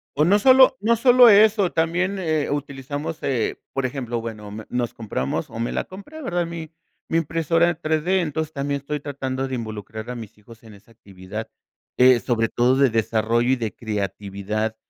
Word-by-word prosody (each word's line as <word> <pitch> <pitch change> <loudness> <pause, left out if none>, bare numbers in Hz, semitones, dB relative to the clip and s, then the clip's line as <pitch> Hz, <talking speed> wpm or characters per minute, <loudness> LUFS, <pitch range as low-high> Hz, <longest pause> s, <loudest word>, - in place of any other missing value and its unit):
O 150 +2 +3
no 200 +4 +4
solo 260 +2 +6
no 230 +3 +3
solo 245 +1 +7
eso, 210 -2 +5
también, 175 +4 0
eh, 155 -4 -1
utilizamos, 145 +2 -4
eh, 125 -5 -1 0.2
por 135 -1 -1
ejemplo, 125 -3 -3
bueno 105 -3 -7
me, 110 +1 -8
nos 120 -1 -2
compramos 100 - -3
o 115 - -8
me 115 - -1
la - - -1
compré, 250 +12 -11
¿verdad?, 175 - -1
mi 165 -1 -7 0.4
mi 165 - +2
impresora 165 +1 +1
en 175 - -3
3D, 160 +4 +1
entonces 160 -2 -2
también 140 -1 -3
estoy 150 +2 -4
tratando 135 -2 -4
de 130 - -3
involucrar 110 0 -7
a - - -6
mis 110 -4 -10
hijos 110 +2 -16
en 110 -2 -13
esa 100 +3 -19
actividad 100 -1 -9 0.5
de 125 -1 +6
sobre 115 -2 0
todo 125 +2 +2
de 135 0 +4
desarrollo 115 +1 +1
y 130 - +4
de 115 -4 -4
creatividad, 105 0 -3
135 Hz, 185 wpm, -22 LUFS, 110-165 Hz, 0.5 s, solo